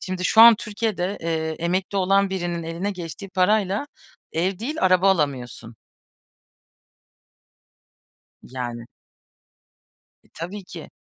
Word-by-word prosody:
Şimdi 185 -1 -4
şu 220 - +5
an 230 0 +10
Türkiye'de, 205 -3 -3
eee, 160 -1 -2
emekli 185 +4 -1
olan 195 +1 +2
birinin 175 -3 -3
eline 170 +5 -3
geçtiği 180 +1 -8
parayla 200 +5 +1 0.5
ev 180 +3 -1
değil, 270 +8 -4
araba 185 +1 +4
alamıyorsun. 130 -8 -2 2.7
Yani. 120 -2 -6 1.4
E, - - -28
tabii 185 +5 -7
ki. - - -10
185 Hz, 105 wpm, -23 LUFS, 165-200 Hz, 2.7 s, an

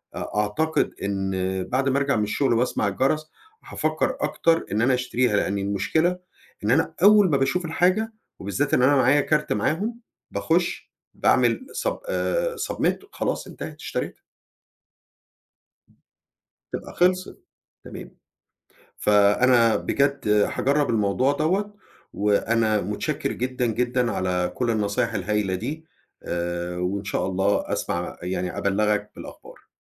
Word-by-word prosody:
أ - - -5
أعتقد 105 +10 0
إن 95 -1 -1
بعد 130 +6 0
ما 135 - +1
أرجَع 140 0 +1
من 105 - +1
الشغل 120 +5 +1
وأسمَع 115 -3 +1
الجَرَس، 145 +9 0 0.3
هافكر - - -1
أكتر 165 0 +1
إن 105 +3 +1
أنا 130 +2 +3
أشتريها 125 -3 +1
لأن 100 - 0
المشكلة 100 - 0 0.4
إن 105 - +1
أنا 145 +5 +2
أول 205 -1 +7
ما 140 - +3
باشوف 135 +7 0
الحاجة 185 +7 +1 0.3
وبالذات 115 +9 -2
إن - - +2
أنا 145 +3 +5
معايا 135 +2 +4
كارت 150 +1 0
معاهم 195 - -1 0.3
باخُش - - -1 0.2
باعمل - - +2 0.2
sub - - -1
آآ، - - 0 0.2
submit - - 0
وخلاص 410 - -3
انتهت - - -8
اشتريتها. - - -4 2.5
تبقى - - -6
خلَصِت 185 +1 +1 0.4
تمام. - - -10 0.8
فأنا 115 +3 +4
بجد 140 -3 0
هاجرّب 135 +7 +2
الموضوع 115 +4 +2
دوَّة 190 +8 0 0.4
وأنا 105 +1 +1
متشكر 105 +2 -2
جدًا، 125 0 -2
جدًا 120 +1 0
على 90 -1 -1
كل 125 -2 -1
النصايح 110 +1 0
الهايلة 100 -1 -1
دي 155 - -5 0.4
آآ، 85 0 -3
وإن 95 +3 -2
شاء 100 -2 -2
الله 95 +2 0
أسمع 85 0 -3
يعني 90 0 -3
أبلّغك 105 +1 0
بالأخبار. - - -12
115 Hz, 125 wpm, -24 LUFS, 100-145 Hz, 2.5 s, أول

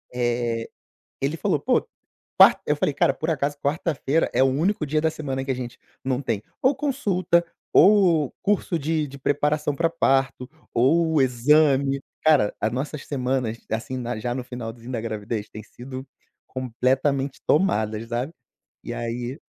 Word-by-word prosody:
eh, 120 -2 -1 0.5
ele 140 +4 -1
falou: - - 0
"Pô, - - +1 0.5
quar" - - +8
Eu 150 - +2
falei: 145 0 0
"Cara 135 - +3
por 155 - -4
acaso 145 -1 -1
quarta-feira 150 0 0
é - - +1
o - - +6
único 155 +5 0
dia 155 +2 +1
da 160 +1 +1
semana 135 -4 -4
que 135 - -4
a 130 - +2
gente 125 -1 -7 0.3
não 130 0 -1
tem, 115 -5 -2 0.2
ou 265 +2 +4
consulta, 195 - +1 0.3
ou 180 -8 +5
curso 200 -4 +1
de 155 0 0
de 140 +1 -10
preparação 145 +1 0
pra 165 +1 +1
parto, 135 -5 +1 0.3
ou 160 +5 +3
exame". 135 +2 +3 0.2
Cara, 150 -10 +4
a 110 - +1
nossas 135 +4 -4
semanas 125 -4 -1
assim 115 +4 -3
na 120 -1 -3
já 120 +2 -2
no 125 -1 -4
finalzinho 120 0 -7
da 115 - -2
gravidez, 110 -1 -4
tem 110 - -8
sido 130 +4 -9 0.4
completamente 130 +2 -1
tomadas, 110 - +1
sabe. 120 +6 -2 0.5
E - - -5
aí, 120 +3 -4
135 Hz, 155 wpm, -24 LUFS, 120-155 Hz, 0.5 s, quar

